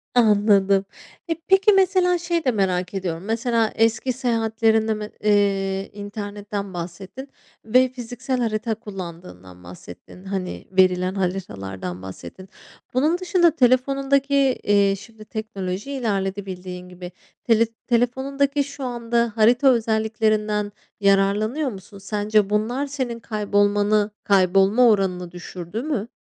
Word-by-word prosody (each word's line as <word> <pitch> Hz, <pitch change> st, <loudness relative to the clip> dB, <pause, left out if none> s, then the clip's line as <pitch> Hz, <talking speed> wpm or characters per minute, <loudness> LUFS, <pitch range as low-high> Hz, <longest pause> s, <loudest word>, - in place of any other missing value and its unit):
Anladım. 200 Hz, -3 st, +4 dB, 0.4 s
E, 330 Hz, -, +1 dB
peki, 385 Hz, +2 st, +5 dB
mesela 370 Hz, -2 st, +3 dB
şeyi 340 Hz, -2 st, -2 dB
de 255 Hz, -, +3 dB
merak 185 Hz, -3 st, -1 dB
ediyorum. 180 Hz, -3 st, -3 dB
Mesela 230 Hz, 0 st, 0 dB
eski 230 Hz, +3 st, +1 dB
seyahatlerinden 225 Hz, -2 st, +1 dB
me 210 Hz, 0 st, -6 dB
eee, 195 Hz, -2 st, +1 dB
internetten 205 Hz, -1 st, -6 dB
bahsettin 185 Hz, +10 st, -7 dB, 0.4 s
ve 255 Hz, +3 st, +4 dB
fiziksel 250 Hz, +1 st, -4 dB
harita 220 Hz, 0 st, -1 dB
kullandığından 165 Hz, -, -10 dB
bahsettin. 90 Hz, -, -13 dB
Hani, 190 Hz, -2 st, -5 dB
verilen 185 Hz, 0 st, +2 dB
haritalardan 95 Hz, -, -4 dB
bahsettin. 95 Hz, -, -10 dB, 0.4 s
Bunun 305 Hz, +7 st, +2 dB
dışında 350 Hz, -2 st, +3 dB
telefonundaki, 275 Hz, +1 st, +2 dB, 0.3 s
eee, 200 Hz, -1 st, +3 dB
şimdi 215 Hz, +1 st, -13 dB
teknoloji 210 Hz, +1 st, -5 dB
ilerledi 200 Hz, -6 st, -2 dB
bildiğin 180 Hz, -1 st, -8 dB
gibi. 180 Hz, 0 st, -9 dB, 0.3 s
Tele 230 Hz, -1 st, +4 dB, 0.2 s
telefonundaki 270 Hz, +4 st, +1 dB
şu 280 Hz, 0 st, -9 dB
anda 235 Hz, -2 st, -1 dB
harita 235 Hz, +5 st, +4 dB
özelliklerinden 220 Hz, -3 st, +1 dB, 0.3 s
yararlanıyor 205 Hz, +8 st, +2 dB
musun? 200 Hz, 0 st, -12 dB
Sence 205 Hz, +1 st, 0 dB
bunlar 235 Hz, +7 st, 0 dB
senin 255 Hz, -4 st, -4 dB
kaybolmanı, 205 Hz, -1 st, +1 dB
kaybolma 195 Hz, +5 st, +4 dB
oranını 180 Hz, -4 st, 0 dB
düşürdü 175 Hz, +4 st, -7 dB
mü? 265 Hz, -8 st, -2 dB
215 Hz, 110 wpm, -22 LUFS, 195-245 Hz, 0.4 s, peki